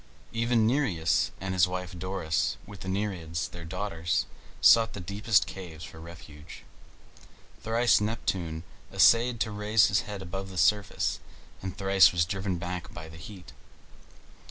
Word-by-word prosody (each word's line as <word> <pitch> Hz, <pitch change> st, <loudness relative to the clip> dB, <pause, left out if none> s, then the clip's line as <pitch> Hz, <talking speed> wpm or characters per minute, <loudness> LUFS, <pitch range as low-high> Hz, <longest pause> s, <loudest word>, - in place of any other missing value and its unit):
Even 115 Hz, 0 st, +2 dB
Nereus, 110 Hz, -, +1 dB
and 95 Hz, 0 st, -3 dB
his 90 Hz, -1 st, +4 dB
wife 90 Hz, 0 st, -5 dB
Doris, 90 Hz, -3 st, -1 dB
with 100 Hz, -2 st, -11 dB
the -, -, -8 dB
Nereids, 90 Hz, -6 st, -2 dB
their 85 Hz, -, -9 dB
daughters, 85 Hz, -2 st, -2 dB, 0.3 s
sought 115 Hz, 0 st, +6 dB
the -, -, -6 dB
deepest 100 Hz, +4 st, +1 dB
caves 85 Hz, -4 st, -9 dB
for 80 Hz, -, -10 dB
refuge. 80 Hz, -2 st, -12 dB, 1.0 s
Thrice 115 Hz, 0 st, +3 dB
Neptune 90 Hz, -7 st, -2 dB, 0.3 s
essayed 115 Hz, 0 st, +4 dB
to 110 Hz, -, 0 dB
raise 105 Hz, +1 st, +3 dB
his 105 Hz, -, +2 dB
head 100 Hz, -2 st, -6 dB
above 95 Hz, +2 st, -6 dB
the 95 Hz, -, -9 dB
surface, 100 Hz, +3 st, +1 dB, 0.4 s
and 95 Hz, +1 st, -6 dB
thrice 95 Hz, -1 st, +5 dB
was 85 Hz, -2 st, +1 dB
driven 95 Hz, 0 st, -2 dB
back 90 Hz, 0 st, -5 dB
by 80 Hz, -2 st, -9 dB
the 80 Hz, -, -12 dB
heat. 90 Hz, +1 st, -11 dB
95 Hz, 145 wpm, -28 LUFS, 85-105 Hz, 1.0 s, sought